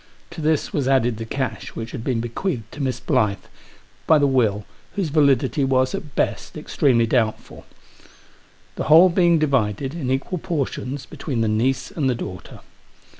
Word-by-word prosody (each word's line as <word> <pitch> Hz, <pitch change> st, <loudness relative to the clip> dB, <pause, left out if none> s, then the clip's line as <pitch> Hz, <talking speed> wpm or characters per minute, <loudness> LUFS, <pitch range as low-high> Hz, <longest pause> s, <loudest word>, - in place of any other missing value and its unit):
To -, -, -7 dB
this 155 Hz, -1 st, 0 dB
was 140 Hz, -3 st, 0 dB
added 125 Hz, -4 st, +2 dB
the 115 Hz, -, -5 dB
cash 130 Hz, 0 st, -4 dB
which 115 Hz, 0 st, -5 dB
had 120 Hz, -, -6 dB
been 120 Hz, -3 st, -1 dB
bequeathed 120 Hz, -, -4 dB
to 150 Hz, -, -7 dB
Miss 130 Hz, -3 st, -1 dB
Blyth 100 Hz, -2 st, 0 dB, 0.6 s
by 160 Hz, -, +6 dB
the 145 Hz, -, +3 dB
will 110 Hz, -7 st, +1 dB, 0.3 s
whose 195 Hz, -6 st, -1 dB
validity 140 Hz, -1 st, +2 dB
was, 130 Hz, -1 st, +2 dB
at 150 Hz, -, -6 dB
best, -, -, -2 dB
extremely 120 Hz, -4 st, +2 dB
doubtful; 115 Hz, -2 st, -2 dB, 1.1 s
the -, -, -2 dB
whole 165 Hz, +5 st, +7 dB
being 175 Hz, -1 st, +3 dB
divided, 135 Hz, -3 st, 0 dB
in 155 Hz, -7 st, -4 dB
equal 135 Hz, +7 st, -1 dB
portions, 140 Hz, -5 st, -3 dB
between 130 Hz, -7 st, -4 dB
the 110 Hz, -, +1 dB
niece 125 Hz, +5 st, 0 dB
and 140 Hz, -5 st, 0 dB
the 125 Hz, -, +1 dB
daughter. 90 Hz, -5 st, -8 dB
130 Hz, 165 wpm, -22 LUFS, 115-150 Hz, 1.1 s, whole